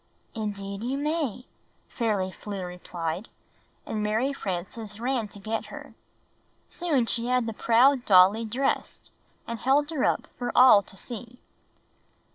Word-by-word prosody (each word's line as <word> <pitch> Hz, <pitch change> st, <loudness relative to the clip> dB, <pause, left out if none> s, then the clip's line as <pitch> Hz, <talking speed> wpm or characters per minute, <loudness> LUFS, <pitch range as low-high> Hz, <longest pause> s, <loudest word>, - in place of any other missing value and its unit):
''Indeed 200 Hz, -2 st, -4 dB
you 260 Hz, +3 st, -1 dB
may!" 290 Hz, -5 st, -2 dB, 0.4 s
Fairly 205 Hz, -6 st, -1 dB
Flew 205 Hz, +1 st, -7 dB
rephed, 180 Hz, 0 st, -5 dB, 0.6 s
and 215 Hz, -, -3 dB
Mary 220 Hz, +6 st, 0 dB
Frances 205 Hz, 0 st, -5 dB
ran 245 Hz, -2 st, -1 dB
to 205 Hz, -, -13 dB
get 220 Hz, +2 st, -3 dB
her. -, -, -10 dB, 0.7 s
Soon 305 Hz, -9 st, 0 dB
she 235 Hz, +1 st, -1 dB
had 250 Hz, -1 st, +2 dB
the 225 Hz, -, -3 dB
proud 245 Hz, +4 st, +4 dB
dolly 195 Hz, +3 st, +6 dB
dressed, 250 Hz, +5 st, -2 dB, 0.3 s
and 230 Hz, -1 st, -5 dB
held 290 Hz, +4 st, +2 dB
her 295 Hz, -5 st, -1 dB
up -, -, +1 dB
for 245 Hz, -, -2 dB
all 250 Hz, -5 st, +8 dB
to 195 Hz, -, -14 dB
see. 240 Hz, +2 st, -8 dB
225 Hz, 135 wpm, -27 LUFS, 200-255 Hz, 0.7 s, all